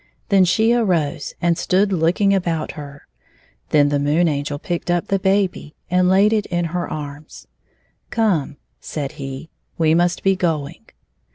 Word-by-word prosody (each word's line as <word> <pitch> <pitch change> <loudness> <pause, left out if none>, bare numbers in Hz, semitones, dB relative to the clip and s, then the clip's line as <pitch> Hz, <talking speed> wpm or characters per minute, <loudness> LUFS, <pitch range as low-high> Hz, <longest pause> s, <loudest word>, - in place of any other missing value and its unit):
Then 195 -3 +5
she 220 +6 +3
arose 170 -10 0
and 170 -1 +3
stood 195 +2 +1
looking 180 +4 +2
about 170 -4 -1
her. 145 -2 -10 0.6
The 145 -1 +3
Moon 150 +5 +2
Angel 145 -1 -2
picked 175 +3 -4
up 175 -1 0
the 195 - +1
baby 190 -5 0 0.2
and 180 0 +3
laid 200 +3 +4
it 215 -2 0
in 175 -1 -1
her 180 -1 -2
arms. 150 0 -8 0.3
" - - -42 0.2
Come," 190 - 0 0.2
said 145 -3 -5
he, 135 +3 -7
" - - -45
we 160 -1 +3
must 175 +1 +1
be 195 0 +3
going." 165 +1 -3
170 Hz, 160 wpm, -20 LUFS, 150-190 Hz, 0.6 s, Then